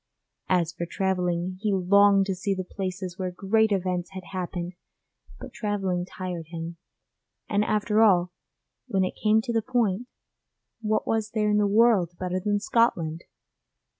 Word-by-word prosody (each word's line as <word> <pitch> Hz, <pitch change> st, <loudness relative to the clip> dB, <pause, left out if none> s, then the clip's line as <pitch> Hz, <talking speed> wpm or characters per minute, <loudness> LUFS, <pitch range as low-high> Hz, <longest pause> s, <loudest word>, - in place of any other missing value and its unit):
As 175 Hz, -2 st, +2 dB
for 170 Hz, -, -4 dB
travelling, 180 Hz, -1 st, -1 dB
he 215 Hz, -1 st, +1 dB
longed 195 Hz, +1 st, +5 dB
to 195 Hz, -, -1 dB
see 195 Hz, +2 st, -2 dB
the 185 Hz, -, -3 dB
places 185 Hz, -1 st, -5 dB
where 185 Hz, -1 st, -1 dB
great 210 Hz, +4 st, +1 dB
events 180 Hz, -2 st, -1 dB
had 185 Hz, -1 st, -7 dB
happened, 180 Hz, -1 st, -4 dB, 0.7 s
but -, -, -9 dB
travelling 195 Hz, -4 st, -1 dB
tired 180 Hz, -4 st, -6 dB
him, 165 Hz, 0 st, -6 dB, 0.7 s
and 205 Hz, 0 st, +1 dB
after 215 Hz, 0 st, +1 dB
all, 180 Hz, -5 st, +4 dB, 0.6 s
when 190 Hz, -1 st, +1 dB
it 185 Hz, -, -1 dB
came 215 Hz, 0 st, +3 dB
to 235 Hz, -, -3 dB
the 225 Hz, -, +2 dB
point, 235 Hz, -2 st, 0 dB, 0.7 s
what 215 Hz, -1 st, 0 dB
was 220 Hz, -1 st, 0 dB
there 210 Hz, -1 st, +2 dB
in 210 Hz, -, +3 dB
the 205 Hz, -, +3 dB
world 200 Hz, -5 st, +3 dB
better 185 Hz, 0 st, -2 dB
than 205 Hz, +2 st, 0 dB
Scotland? 175 Hz, -8 st, +1 dB
190 Hz, 155 wpm, -26 LUFS, 180-210 Hz, 0.7 s, longed